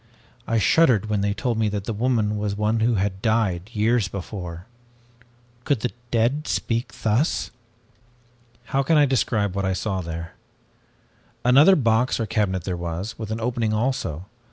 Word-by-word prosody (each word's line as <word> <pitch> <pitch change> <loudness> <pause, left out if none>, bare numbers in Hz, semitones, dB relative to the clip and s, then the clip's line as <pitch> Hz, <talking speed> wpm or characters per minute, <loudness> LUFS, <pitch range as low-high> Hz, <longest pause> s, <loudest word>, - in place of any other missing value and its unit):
I 115 - +1
shuddered 110 - +3
when 105 -2 +1
they 100 0 0
told 120 -3 -1
me 110 -1 +2
that 100 -1 -3
the 115 - -2
woman 110 -2 0
was 105 -1 -2
one 105 +2 0
who 115 +1 +2
had 95 -1 -1
died 105 -4 0
years 115 -1 +1
before. 90 -2 -7 1.0
Could 140 -5 0
the 125 - -1 0.2
dead 125 +7 +1
speak 115 +2 -1
thus? 115 +8 +1 1.2
"How 135 - +3
can 155 +3 +3
I 145 - +6
describe 110 -7 0
what 100 - -1
I 95 0 0
saw 95 0 -2
there? 85 0 -6 1.1
Another 140 +10 +7
box 120 -3 +2
or 115 - 0
cabinet 95 -4 -1
there 90 0 -3
was, 85 +5 -5
with 110 -2 -5
an 110 +1 -3
opening 115 -2 -1
also. 105 - -1
110 Hz, 160 wpm, -23 LUFS, 100-120 Hz, 1.2 s, Another